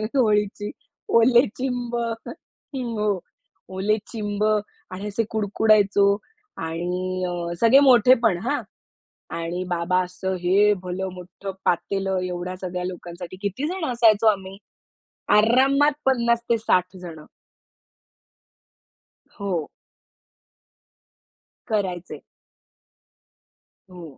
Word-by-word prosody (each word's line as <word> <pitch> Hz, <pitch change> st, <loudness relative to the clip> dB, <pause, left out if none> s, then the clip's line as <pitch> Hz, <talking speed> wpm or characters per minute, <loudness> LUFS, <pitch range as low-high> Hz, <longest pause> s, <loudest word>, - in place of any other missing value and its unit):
होळीची 210 Hz, -4 st, +1 dB, 0.4 s
ओले 240 Hz, +2 st, +5 dB
चिंब 245 Hz, -2 st, -3 dB, 0.8 s
हो. 215 Hz, -6 st, -1 dB, 0.6 s
ओले 205 Hz, +3 st, +1 dB
चिंब 210 Hz, -2 st, -3 dB
आणि 210 Hz, -2 st, -3 dB
असे 210 Hz, +2 st, -1 dB
कुडकुडायचो 205 Hz, -2 st, +3 dB, 0.5 s
आणि 180 Hz, +3 st, -3 dB
अ, -, -, -3 dB, 0.3 s
सगळे 230 Hz, +4 st, +7 dB
मोठेपण 245 Hz, -6 st, +5 dB
हां. 285 Hz, +5 st, -1 dB, 0.8 s
आणि 170 Hz, +2 st, -3 dB
बाबा 175 Hz, +1 st, +1 dB
असं 185 Hz, +1 st, -4 dB
हे 200 Hz, +4 st, +4 dB
भलं 185 Hz, +1 st, -3 dB
मोठं 185 Hz, +2 st, -8 dB
पातेलं 195 Hz, +2 st, 0 dB
एवढ्या 180 Hz, 0 st, -4 dB
सगळ्या 180 Hz, -1 st, -4 dB
लोकांसाठी 175 Hz, 0 st, -7 dB
किती 200 Hz, +8 st, -2 dB
जण 365 Hz, 0 st, -3 dB
असायचो 225 Hz, -3 st, +4 dB
आम्ही 195 Hz, -2 st, +1 dB, 0.8 s
आरामात 270 Hz, +7 st, +4 dB
50 235 Hz, -2 st, +2 dB
ते 230 Hz, -, +3 dB
60 185 Hz, -4 st, +1 dB
जण 170 Hz, -3 st, -9 dB, 2.2 s
हो. 180 Hz, -6 st, -2 dB, 2.0 s
करायचे. 190 Hz, -5 st, -2 dB, 1.7 s
हो. 180 Hz, -1 st, -10 dB
200 Hz, 90 wpm, -23 LUFS, 180-230 Hz, 2.2 s, सगळे